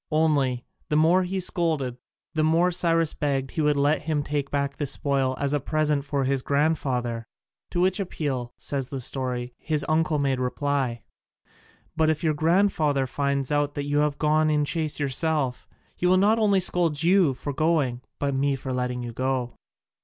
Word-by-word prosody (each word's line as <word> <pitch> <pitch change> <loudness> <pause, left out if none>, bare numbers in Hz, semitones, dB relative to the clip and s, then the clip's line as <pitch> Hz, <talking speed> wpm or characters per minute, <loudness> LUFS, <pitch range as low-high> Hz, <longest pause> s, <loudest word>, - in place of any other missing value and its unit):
Only, 145 -6 +1 0.2
the 150 - +1
more 165 +4 +4
he 185 +1 -2
scolded 160 -8 0 0.4
the 155 -1 +1
more 165 +3 +3
Cyrus 165 -2 +1
begged 135 -2 -1
he 160 - -2
would 150 -1 +2
let 145 +2 +2
him 150 -1 -1
take 145 -1 -2
back 140 -1 -2
the 145 - -2
spoil 135 -1 +1
as 140 0 0
a 145 - +2
present 150 0 0
for 140 -1 -1
his 135 0 0
grandfather. 130 -6 0 0.4
To 175 - -2
which 185 +2 +2
appeal, 140 -10 -3
says 135 -3 -3
the 135 - -4
story, 125 -1 -2
his 155 -2 -1
uncle 155 -1 +1
made 135 -2 0
reply: 130 -2 -1 0.9
"But 160 -1 +2
if 155 0 -1
your 155 -2 +2
grandfather 155 -3 +2
finds 140 +1 -1
out 145 0 0
that 145 - -3
you 145 0 +1
have 150 -1 +1
gone 155 0 +2
in 150 -1 +2
chase 155 0 -2
yourself, 140 -1 -1 0.3
he 180 - 0
will 185 +1 +5
not 210 +4 +3
only 200 -3 +3
scold 165 -4 +1
you 175 -6 +4
for 140 +3 -5
going 145 -5 +1 0.2
but 140 -1 -1
me 140 +1 +1
for 130 0 -5
letting 125 -1 -2
you 120 -1 -6
go." 130 -1 -2
145 Hz, 180 wpm, -25 LUFS, 135-160 Hz, 0.9 s, will